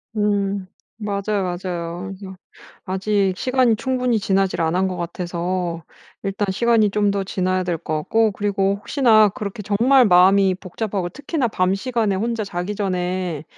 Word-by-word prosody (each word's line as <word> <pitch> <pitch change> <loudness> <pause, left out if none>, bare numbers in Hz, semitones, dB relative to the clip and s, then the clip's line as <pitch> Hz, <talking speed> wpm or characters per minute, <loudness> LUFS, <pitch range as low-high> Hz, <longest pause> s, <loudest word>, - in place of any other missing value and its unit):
음. 200 -2 0 0.3
맞아요, 205 -2 -3 0.3
맞아요. 175 0 -4
그래서 190 -2 -9 0.5
아직 195 0 0
시간이 255 -2 +2
충분히 250 -1 0
지나지를 195 -3 +1
않은 180 +4 +1
것 185 - -4
같아서 175 0 -3 0.4
일단 200 +1 -2
시간이 225 +1 +3
좀 205 0 +1
더 200 -1 -1
지나야 185 -1 -1
될 175 -2 -1
것 155 -1 -3
같고 220 +6 +1
그리고 200 -1 0
혹시나 220 -1 +4
그렇게 205 +1 -6
정말 240 +5 +4
마음이 190 +1 +5
복잡하고 190 -1 -4
특히나 290 - -2
밤 185 -2 +1
시간에 225 -1 -1
혼자 230 +2 -1
자기 190 +1 -4
전에 180 -5 -2
195 Hz, 325 characters per minute, -21 LUFS, 185-215 Hz, 0.5 s, 마음이